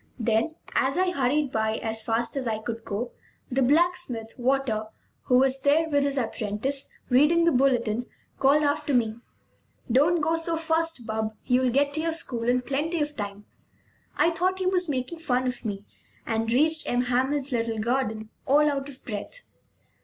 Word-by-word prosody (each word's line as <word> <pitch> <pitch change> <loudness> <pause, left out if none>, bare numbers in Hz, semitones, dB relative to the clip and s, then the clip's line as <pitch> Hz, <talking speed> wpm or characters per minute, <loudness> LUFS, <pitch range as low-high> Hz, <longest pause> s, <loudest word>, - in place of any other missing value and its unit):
Then, 230 +6 0 0.2
as 270 +3 +1
I 370 0 +2
hurried 280 -2 +1
by 220 0 0
as 220 0 -3
fast 230 +3 -1
as 265 -3 -2
I 220 -1 0
could 225 +1 -6
go, 225 +4 -4 0.4
the 265 +2 +1
blacksmith, 275 -5 +1
Wachter, 245 -4 0 0.4
who 250 - +4
was 265 +1 +3
there, 300 +4 +3
with 285 -2 +2
his 280 0 -1
apprentice, 230 +3 -2 0.2
reading 300 +7 +5
the 335 - +4
bulletin, 245 -4 +1 0.3
called 285 +3 +4
after 290 -1 +1
me: 225 -2 +1 0.7
"Don't 300 +8 +4
go 320 +2 +1
so 330 0 -1
fast, 325 -5 0
bub; 220 0 -3
you'll 255 0 +3
get 280 +3 +2
to 310 - -2
your 330 0 -1
school 245 -7 -2
in 250 0 +2
plenty 300 +6 -1
of 295 0 -2
time!" 205 -1 -6 0.7
I 335 - +4
thought 365 +3 0
he 375 - -3
was 365 -2 +1
making 270 +4 -3
fun 255 -6 0
of 250 -1 -3
me, 205 -2 -4 0.4
and 225 0 -1
reached 310 +5 +2
M. 245 0 +1
Hamel's 260 +3 0
little 230 -2 -1
garden 220 -1 -1 0.2
all 295 +2 +4
out 275 0 -3
of 270 -2 -12
breath. 225 - -6
265 Hz, 175 wpm, -26 LUFS, 230-300 Hz, 0.7 s, reading